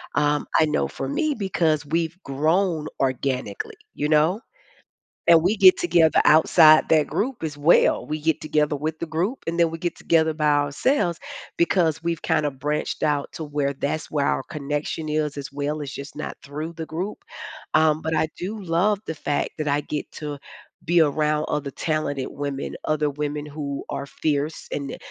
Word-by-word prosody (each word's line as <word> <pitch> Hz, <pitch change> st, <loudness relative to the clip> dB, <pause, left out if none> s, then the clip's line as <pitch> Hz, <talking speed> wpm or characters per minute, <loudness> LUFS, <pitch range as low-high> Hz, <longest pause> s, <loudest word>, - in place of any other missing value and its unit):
um, 145 Hz, 0 st, +1 dB
I 160 Hz, -, +5 dB
know 150 Hz, 0 st, 0 dB
for 135 Hz, -, -5 dB
me, 305 Hz, -, 0 dB
because 165 Hz, -7 st, 0 dB
we've 165 Hz, +2 st, -1 dB
grown 155 Hz, +3 st, 0 dB
organically. 130 Hz, -5 st, -2 dB, 0.2 s
You 150 Hz, +1 st, -2 dB
know? 160 Hz, +7 st, +3 dB, 0.9 s
And 165 Hz, -1 st, +7 dB
we 190 Hz, +6 st, +2 dB
get 190 Hz, -2 st, +7 dB
together 170 Hz, -2 st, +3 dB
outside 155 Hz, 0 st, +6 dB
that 155 Hz, -2 st, +3 dB
group 250 Hz, -1 st, -2 dB
as 150 Hz, -2 st, -4 dB
well. 155 Hz, +4 st, +4 dB
We 155 Hz, 0 st, -3 dB
get 160 Hz, 0 st, 0 dB
together 150 Hz, -1 st, +1 dB
with 155 Hz, +2 st, -4 dB
the 170 Hz, -, -2 dB
group, 180 Hz, -, -2 dB
and 170 Hz, +1 st, -2 dB
then 170 Hz, -1 st, +4 dB
we 165 Hz, -, -5 dB
get 175 Hz, +1 st, -3 dB
together 160 Hz, -1 st, +2 dB
by 150 Hz, -1 st, -1 dB
ourselves 150 Hz, -, +1 dB, 0.4 s
because 170 Hz, -2 st, +2 dB
we've 170 Hz, -2 st, -2 dB
kinda 155 Hz, -3 st, +1 dB
branched 145 Hz, +3 st, -3 dB
out 145 Hz, -2 st, 0 dB
to -, -, -7 dB
where 145 Hz, -1 st, -1 dB
that's 145 Hz, +3 st, -3 dB
where 145 Hz, -2 st, 0 dB
our -, -, 0 dB
connection 150 Hz, 0 st, -4 dB
is 150 Hz, -1 st, -1 dB
as 140 Hz, -2 st, -6 dB
well. 145 Hz, +2 st, -2 dB
It's 140 Hz, -2 st, -5 dB
just 140 Hz, +1 st, -8 dB
not 155 Hz, -, -5 dB
through 155 Hz, +4 st, -6 dB
the 160 Hz, -1 st, -6 dB
group. 185 Hz, +6 st, -4 dB, 0.6 s
Um, 155 Hz, 0 st, +4 dB
but 160 Hz, +1 st, -1 dB
I 155 Hz, -, +1 dB
do 205 Hz, +3 st, -5 dB
love 185 Hz, +4 st, +1 dB
the 160 Hz, -, -3 dB
fact 145 Hz, -, -1 dB
that 155 Hz, -, -2 dB
I 145 Hz, +1 st, +2 dB
get 150 Hz, 0 st, -4 dB
to 145 Hz, -2 st, -6 dB, 0.5 s
be 170 Hz, +1 st, +3 dB
around 150 Hz, 0 st, +2 dB
other 145 Hz, -2 st, -2 dB
talented 150 Hz, -4 st, -2 dB
women, 140 Hz, -1 st, -4 dB
other 155 Hz, -1 st, +1 dB
women 150 Hz, +1 st, -4 dB
who 145 Hz, -2 st, -5 dB
are 140 Hz, -, -4 dB
fierce 150 Hz, +1 st, -2 dB
and 140 Hz, -1 st, -4 dB
155 Hz, 180 wpm, -23 LUFS, 145-165 Hz, 0.9 s, And